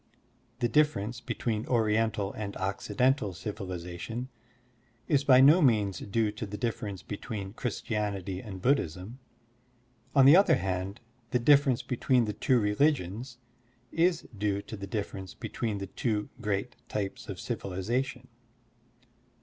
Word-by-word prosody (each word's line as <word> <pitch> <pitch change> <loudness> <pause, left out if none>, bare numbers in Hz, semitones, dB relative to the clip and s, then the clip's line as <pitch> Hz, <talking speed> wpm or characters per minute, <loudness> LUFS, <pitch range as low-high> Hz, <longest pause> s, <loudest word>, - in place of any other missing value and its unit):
The 120 - +3
difference 120 -4 +1
between 110 -2 -2
Oriental 110 -3 +1
and 105 -2 -5
Occidental 105 +2 0
civilization 90 +4 -5 0.8
is 145 -2 +3
by 130 -2 +7
no 150 +7 +7
means 105 - +3
due 105 +1 0
to 105 0 -6
the 105 +1 -6
difference 105 -4 -3
between 100 -2 -6
Christianity 105 -6 -3
and 95 -4 -8
Buddhism. 115 - 0 1.0
On 135 -2 +7
the 140 +4 +9
other 185 -4 +6
hand, 95 -2 -3 0.3
the 125 - +2
difference 140 0 +4
between 125 -1 +2
the 105 - -3
two 125 +4 +2
religions 115 - 0 0.5
is 170 0 +1
due 100 0 -1
to - - -7
the 100 -1 -7
difference 95 -2 -5
between 110 -3 -3
the 100 - -4
two 105 0 -2
great 105 +2 -2
types 100 -2 -4
of - - -5
civilization. 120 +7 -3
110 Hz, 125 wpm, -29 LUFS, 100-125 Hz, 1.0 s, the